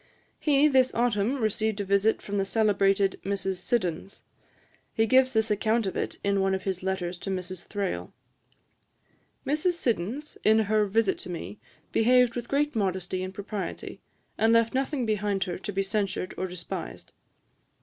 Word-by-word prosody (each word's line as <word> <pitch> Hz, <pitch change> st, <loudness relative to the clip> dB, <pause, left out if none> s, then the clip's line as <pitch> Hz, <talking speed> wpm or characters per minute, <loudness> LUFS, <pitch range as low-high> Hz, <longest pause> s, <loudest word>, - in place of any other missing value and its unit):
He 295 Hz, -1 st, +4 dB
this 260 Hz, -3 st, +3 dB
autumn 235 Hz, +2 st, +1 dB
received 220 Hz, -1 st, 0 dB
a 200 Hz, -, -2 dB
visit 200 Hz, +3 st, +2 dB
from 205 Hz, 0 st, -2 dB
the -, -, +2 dB
celebrated 195 Hz, -2 st, +2 dB
Mrs. 195 Hz, -1 st, -2 dB
Siddons. 185 Hz, -3 st, -2 dB, 0.7 s
He 225 Hz, -, +2 dB
gives 260 Hz, +2 st, +4 dB
this 220 Hz, -1 st, +2 dB
account 215 Hz, +2 st, +1 dB
of 190 Hz, -, -3 dB
it -, -, -3 dB
in 200 Hz, -1 st, +2 dB
one 190 Hz, 0 st, +2 dB
of 190 Hz, -, -5 dB
his 190 Hz, -2 st, -2 dB
letters 185 Hz, -2 st, -3 dB
to 195 Hz, -, -6 dB
Mrs. 185 Hz, -1 st, -5 dB
Thrale: 200 Hz, -2 st, -3 dB, 1.3 s
'Mrs. 305 Hz, +5 st, +1 dB
Siddons, 255 Hz, -, -2 dB
in 220 Hz, +1 st, +5 dB
her 215 Hz, -1 st, +2 dB
visit 205 Hz, -1 st, +1 dB
to -, -, -8 dB
me, 175 Hz, +4 st, -6 dB, 0.3 s
behaved 250 Hz, +1 st, +4 dB
with 240 Hz, -1 st, -5 dB
great 290 Hz, 0 st, +1 dB
modesty 185 Hz, -3 st, -1 dB
and 185 Hz, 0 st, -4 dB
propriety, 200 Hz, -2 st, -6 dB, 0.4 s
and 225 Hz, +1 st, +4 dB
left 230 Hz, 0 st, +3 dB
nothing 265 Hz, 0 st, -1 dB
behind 210 Hz, -2 st, 0 dB
her 180 Hz, -2 st, -5 dB
to 205 Hz, -, -5 dB
be 195 Hz, 0 st, 0 dB
censured 195 Hz, -2 st, -2 dB
or 185 Hz, -, -2 dB
despised. 175 Hz, -, -7 dB
205 Hz, 160 wpm, -27 LUFS, 190-230 Hz, 1.3 s, in